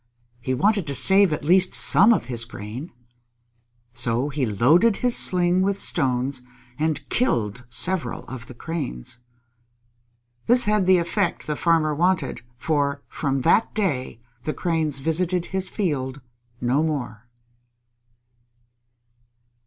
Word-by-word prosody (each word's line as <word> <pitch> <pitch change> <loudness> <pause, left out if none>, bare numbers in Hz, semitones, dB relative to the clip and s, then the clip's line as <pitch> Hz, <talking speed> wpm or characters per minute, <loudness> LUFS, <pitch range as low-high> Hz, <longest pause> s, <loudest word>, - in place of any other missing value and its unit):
He 130 +2 -2
wanted 200 - +1
to 140 - 0
save 195 +4 +5
at 150 -1 -3
least 185 +3 +3
some 205 +4 +5
of 220 - +1
his 120 -2 -4
grain. 115 - -8 1.0
So 120 +3 -1
he 140 -3 -2
loaded 155 - +3
his 245 -1 +1
sling 180 0 +3
with 200 +1 0
stones 130 -7 0 0.4
and 155 -2 -1
killed 120 - -1
several 155 0 0
of 125 -3 -9
the 125 - -11
Cranes. 130 - -6 1.3
This 245 +1 +5
had 210 -3 +1
the 185 -1 +6
effect 175 +2 -1
the 150 - -2
Farmer 160 -2 +1
wanted, 160 -6 0 0.2
for 140 0 -1
from 135 -2 -2
that 220 - +2
day 145 - -2 0.2
the 155 - -3
Cranes 160 -5 -1
visited 170 +5 -1
his 190 -1 -2
field 145 - -3 0.4
no 125 +4 +1
more. 125 -8 -4
155 Hz, 125 wpm, -23 LUFS, 130-185 Hz, 1.3 s, the